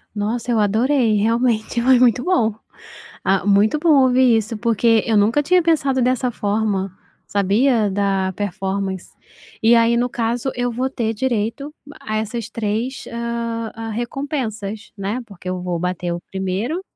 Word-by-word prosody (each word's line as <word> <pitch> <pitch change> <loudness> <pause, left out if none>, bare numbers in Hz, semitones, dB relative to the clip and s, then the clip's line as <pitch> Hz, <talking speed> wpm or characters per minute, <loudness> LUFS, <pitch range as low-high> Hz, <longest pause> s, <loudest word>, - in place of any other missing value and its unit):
Nossa, 225 +4 -2
eu 230 - +2
adorei. 225 +3 +2
Realmente 230 +1 +1
foi 255 +1 +5
muito 245 -1 +3
bom. 325 - +2 0.7
Ah, 195 -1 +1
muito 205 +7 +3
bom 300 -4 +5
ouvir 255 -2 +4
isso, 220 +1 -3
porque 230 0 +2
eu 220 -2 +2
nunca 220 +8 +3
tinha 360 +4 +4
pensado 280 -6 +1
dessa 250 0 +1
forma, 205 -3 -1 0.3
sabia, 210 +3 +2
da 195 -1 0
performance. 195 -1 -3 0.5
E 230 +2 +5
aí, 230 0 +4
no 245 +1 +1
caso 235 +3 -2
eu 245 0 -1
vou 255 +3 -2
ter 230 -4 -2
direito 240 +4 -2 0.3
a 215 0 -3
essas 220 +1 -4
3 230 +3 -3
hã, 235 -1 -4
a 225 0 -6
recompensas, 225 -3 -4
né. 200 +6 -3
Porque 185 -4 -9
eu 185 0 -3
vou 180 -1 -3
bater 180 0 -2
o 170 - -5
1º 195 - -2
225 Hz, 150 wpm, -20 LUFS, 205-245 Hz, 0.7 s, foi